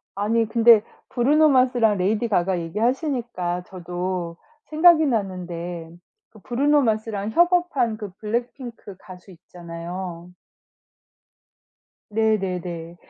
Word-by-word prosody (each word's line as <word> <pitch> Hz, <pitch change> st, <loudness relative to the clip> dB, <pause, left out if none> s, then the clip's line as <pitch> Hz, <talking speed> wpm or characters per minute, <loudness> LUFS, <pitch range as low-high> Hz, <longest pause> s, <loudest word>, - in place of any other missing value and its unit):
아니 220 Hz, +3 st, 0 dB
근데 230 Hz, -1 st, +6 dB, 0.3 s
브루노 295 Hz, +5 st, +3 dB
마스랑 250 Hz, -5 st, +3 dB
레이디 210 Hz, +5 st, 0 dB
가가 180 Hz, -2 st, +1 dB
얘기하시니까 225 Hz, -, -2 dB
저도 180 Hz, -1 st, -5 dB, 0.3 s
생각이 315 Hz, 0 st, +5 dB
났는데 180 Hz, -, -4 dB, 0.4 s
그 215 Hz, -, -17 dB
브루노 285 Hz, +8 st, +2 dB
마스랑 220 Hz, -2 st, -1 dB
협업한 345 Hz, -9 st, +2 dB
그 210 Hz, -3 st, -7 dB
블랙핑크 235 Hz, -1 st, -5 dB
가수 185 Hz, +1 st, -13 dB
있잖아요. 175 Hz, 0 st, -8 dB, 1.8 s
네네네. 180 Hz, -6 st, -2 dB
210 Hz, 245 characters per minute, -23 LUFS, 180-240 Hz, 1.8 s, 근데